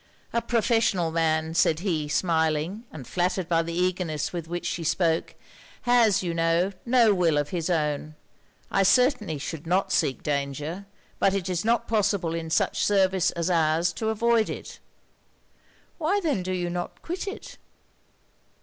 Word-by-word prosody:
'A 235 - +1
professional 225 -8 +1
man,' 160 -1 0
said 165 -1 +2
he, 165 -6 -1
smiling, 160 +5 0
and 140 -5 -9
flattered 180 +2 -1
by 165 -1 +2
the 165 0 -5
eagerness 180 -4 -1
with 170 -2 -5
which 175 +1 -4
she 170 - -2
spoke, 165 0 0 0.5
'has, 230 -6 +4
you 175 -2 -2
know, 165 +3 +1
no 235 -3 +5
will 170 -5 +2
of 145 0 0
his 170 -2 -2
own. 155 -2 -1 0.6
I 195 - +2
certainly 225 - +3
should 155 +2 -6
not 190 +2 +1
seek 135 - 0
danger; 150 +6 -3 0.3
but 195 0 +3
it 195 -2 -2
is 180 -2 -1
not 230 +1 +1
possible 200 -6 +1
in 165 -1 -4
such - - +1
service 190 -2 +3
as 170 +1 -1
ours 165 +1 +2
to 220 - -2
avoid 225 0 +2
it.' - - -7 1.2
'Why 340 +6 +1
then 305 - 0
do 185 +1 -4
you 175 -1 -2
not 175 0 -5
quit 360 +4 -4
it?' 395 - -8
175 Hz, 160 wpm, -26 LUFS, 160-205 Hz, 1.2 s, no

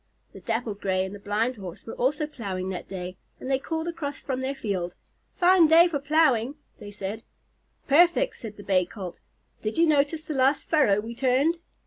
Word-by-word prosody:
The - - -10
Dappled 225 -3 -3
Gray 185 -1 +1
and 190 - -7
the 205 - -8
Blind 220 +5 -1
Horse 185 -1 -9
were 225 - -7
also 295 +5 0
plowing 195 -10 -5
that 185 - -5
day, 185 -1 -6 0.2
and 260 - -5
they 265 - +2
called 320 +3 -3
across 290 -4 -4
from 260 -2 -3
their 270 +1 -2
field. 190 -8 -3 0.4
"Fine 360 -2 +5
day 330 +3 +7
for 310 -5 -2
plowing," 280 -4 +2 0.2
they 205 - -9
said. 205 +2 -5 0.7
"Perfect," 345 - +4
answered 215 -3 -9
the 205 - -10
Bay 185 -2 +3
Colt. 185 -4 -8 0.4
"Did 215 +5 -3
you 335 - +5
notice 310 +1 +1
the 310 - -4
last 270 +1 +2
furrow 270 -11 +4
we 230 +2 -7
turned? 270 +7 +2
255 Hz, 190 wpm, -26 LUFS, 205-300 Hz, 0.7 s, day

